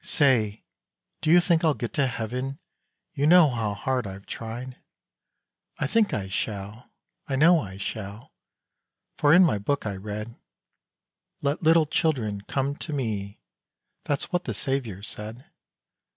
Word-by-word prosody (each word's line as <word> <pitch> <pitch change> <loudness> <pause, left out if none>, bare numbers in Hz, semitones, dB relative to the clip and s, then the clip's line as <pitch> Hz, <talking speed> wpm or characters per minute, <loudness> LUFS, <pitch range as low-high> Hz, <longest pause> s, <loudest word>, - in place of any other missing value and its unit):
Say! 115 -8 +2 0.6
do 155 - 0
you 175 +2 +8
think 175 -1 +2
I'll 155 -3 +3
get 120 - -5
to 140 -2 +2
heaven? 125 +3 -3 0.6
You 145 +2 +1
know 170 -3 +7
how 110 -4 -2
hard 125 0 -1
I've 95 0 -9
tried. 120 +3 -6 1.0
"I - - -1
think 215 +9 +2
I 100 - -2
shall 100 +3 -5 0.4
I 135 - -1
know 165 +5 +6
I 95 -9 -7
shall 100 +1 -6 0.9
For 145 - +5
in 180 +4 +8
my 105 -11 +1
book 140 +7 -1
I 100 -2 -2
read 105 +3 -6 1.1
'Let 145 +2 0
little 165 -1 +5
children 125 - 0
come 135 +6 -2
to 155 - -6
Me,' 105 -8 -3 0.6
That's 145 -2 -2
what 180 0 0
the 115 - -3
Saviour 115 -5 -3
said. 110 +4 -8
125 Hz, 145 wpm, -26 LUFS, 105-145 Hz, 1.1 s, you